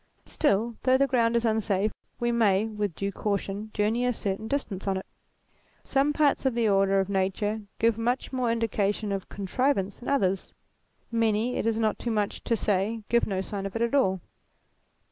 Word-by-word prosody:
Still, 230 -4 +1
though 260 0 +4
the 275 - +4
ground 235 -3 +2
is 235 0 +2
unsafe 215 -2 +1 0.3
we 240 0 +1
may, 215 -3 +3
with 210 -5 -3
due 200 0 -2
caution, 200 +1 -3
journey 220 +4 +1
a 250 - +2
certain 210 -1 -3
distance 215 -8 -3
on 195 -1 +1
it. 190 - -6 0.8
Some 275 +2 +2
parts 295 -1 +2
of 265 -3 +1
the 235 -2 +2
order 195 -1 +3
of 190 - 0
nature 200 +2 -1 0.2
give 230 -1 +2
much 245 +4 -1
more 250 -2 +1
indication 210 -2 0
of 195 -2 -3
con 200 - -6
trivance 205 -3 0
than 245 - -6
others; 195 -9 0 0.6
many, 230 +1 +1
it - - -1
is 225 -1 +1
not 220 -2 0
too 240 - -3
much 210 -2 -1
to 230 - +1
say, 210 +3 0
give 235 +1 +3
no 190 -2 -1
sign 195 0 -4
of 195 - -11
it 230 - +1
at 235 - -1
all. 190 -10 +2
220 Hz, 190 wpm, -27 LUFS, 195-235 Hz, 0.8 s, though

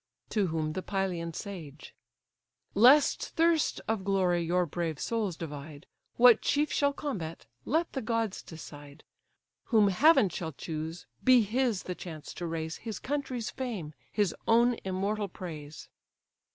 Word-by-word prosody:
To 210 -3 +2
whom 160 -2 -2
the 185 - -3
Pylian 185 -4 -2
sage: 165 -8 -8 0.8
"Lest 255 +8 +6
thirst 330 -1 +2
of 220 -3 -1
glory 185 -3 +2
your 175 +2 +1
brave 165 -1 -3
souls 215 -7 -1
divide, 150 0 -8 0.3
What 245 -1 +7
chief 295 +1 +1
shall 285 0 +3
combat, 190 - -5 0.2
let 325 +5 0
the 265 - -2
gods 225 -2 -1
decide. 145 -3 -11 0.6
Whom 215 -4 +4
heaven 220 - +5
shall 160 -3 -5
choose, 160 +4 -5 0.2
be 255 -3 +6
his 230 -1 0
the 180 - -4
chance 160 -4 -8
to 175 - -5
raise 160 0 -3
His 225 -2 -6
country's 260 -5 -3
fame, 210 - -5 0.2
his 205 -5 +1
own 235 +2 +5
immortal 200 +2 -1
praise." 155 -5 -8
190 Hz, 140 wpm, -30 LUFS, 165-235 Hz, 0.8 s, What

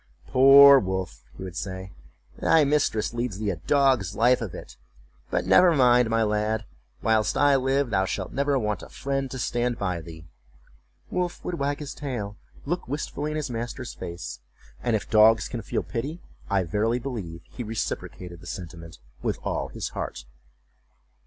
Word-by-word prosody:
"Poor 140 +1 +8
Wolf," 95 - -4 0.2
he - - -7
would 90 -2 -7
say, 95 +1 -5 0.5
"thy 160 -2 +4
mistress 140 -7 +1
leads 120 -4 -3
thee 105 -1 -1
a 90 - -5
dog's 130 - +2
life 120 +3 +4
of 110 -7 -5
it; - - -10 0.5
but - - -1
never 175 -2 +6
mind, 125 -3 +5
my 115 0 +2
lad, 105 +1 0 0.4
whilst 110 -1 +2
I 145 0 +5
live 135 -1 +1
thou 95 -2 +2
shalt 95 -1 -4
never 140 0 +1
want 105 -5 -1
a - - -11
friend 135 -1 -3
to 130 - -6
stand 120 -1 -1
by 90 -4 -2
thee!" 80 0 -11 0.9
Wolf 180 -1 -2
would 175 -2 -3
wag 140 +1 0
his 150 -2 -6
tail, 120 -8 -5 0.3
look 175 +5 -3
wistfuly 145 +2 -3
in 155 - -3
his 150 -4 -3
master's 115 0 -5
face, 85 0 -7 0.4
and 120 -2 +1
if 105 - -3
dogs 110 -1 +5
can 120 -3 -5
feel - - -2
pity 140 +8 -4 0.3
I 100 -3 +2
verily 105 +7 0
believe 110 -11 -6
he 125 - -10
reciprocated 95 -5 -5
the - - -12
sentiment 85 -2 -8 0.2
with - - -1
all - - -2
his - - -5
heart. - - -6
115 Hz, 170 wpm, -26 LUFS, 95-135 Hz, 0.9 s, Poor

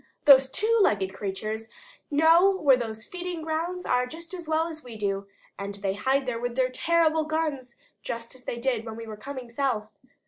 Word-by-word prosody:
Those 270 -2 +8
two 450 +9 +2
legged 195 - +2
creatures 215 +3 -4 0.4
know 325 +5 +6
where 285 -7 +5
those 220 -3 -5
feeding 355 -2 -5
grounds 335 +3 -2
are 250 0 +2
just 330 +5 -9
as 345 -3 -7
well 320 +1 +2
as 320 -2 -7
we 245 -3 -9
do, 200 -1 -2 0.3
and 200 0 -5
they 200 -1 -2
hide 265 +6 +1
there 245 -2 -2
with 245 0 -3
their 255 -1 +1
terrible 320 +1 +2
guns 305 -6 -2 0.3
just 230 0 -5
as 255 -1 -15
they 235 - -3
did 240 -2 0
when 225 -1 -7
we 230 0 -7
were 220 -1 -7
coming 255 +2 -8
south. 235 -5 -1
260 Hz, 195 wpm, -27 LUFS, 225-320 Hz, 0.4 s, Those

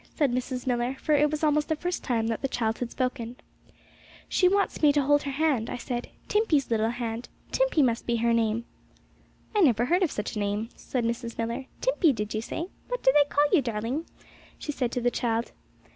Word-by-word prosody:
said 290 -5 +2
Mrs. 250 0 -3
Millar, 245 +1 0
for 305 +3 0
it 295 0 +4
was 305 +1 -3
almost 300 0 +2
the 315 - +2
first 355 +3 -3
time 230 -3 0
that 225 -1 -2
the 270 - 0
child 225 -4 -1
had 245 - -2
spoken. 250 -2 -3 0.9
'She 365 - +3
wants 395 +2 +1
me 300 -2 +6
to 290 -1 +2
hold 290 +1 +4
her 280 - -4
little 300 +4 0
hand,' 250 -8 +1
I - - -3
said, 245 0 -4 0.2
'Timpey's 330 - +2
little 220 0 +2
hand. 235 0 -4 0.2
Timpey - - +3
must 235 -3 0
be 235 - +2
her 235 0 +2
name!' 230 0 +1 0.9
'I 415 - +4
never 240 - +4
heard 350 +8 +2
of 360 - +3
such 210 -3 -4
a - - -2
name,' 205 +2 -1
said 245 -3 -3
Mrs. 235 0 -3
Millar. 235 +3 -3
'Timpey, 390 - +3
did 210 -2 -4
you 215 - -1
say? 330 +9 -4 0.2
What - - -3
do 265 - +6
they 290 -1 +5
call 290 +1 +3
you, 360 - +5
darling?' 235 +6 -3 0.5
she 295 - -4
said 255 -4 -1
to 245 - -1
the 245 0 +2
child. 230 -1 -1
250 Hz, 220 wpm, -27 LUFS, 230-295 Hz, 0.9 s, me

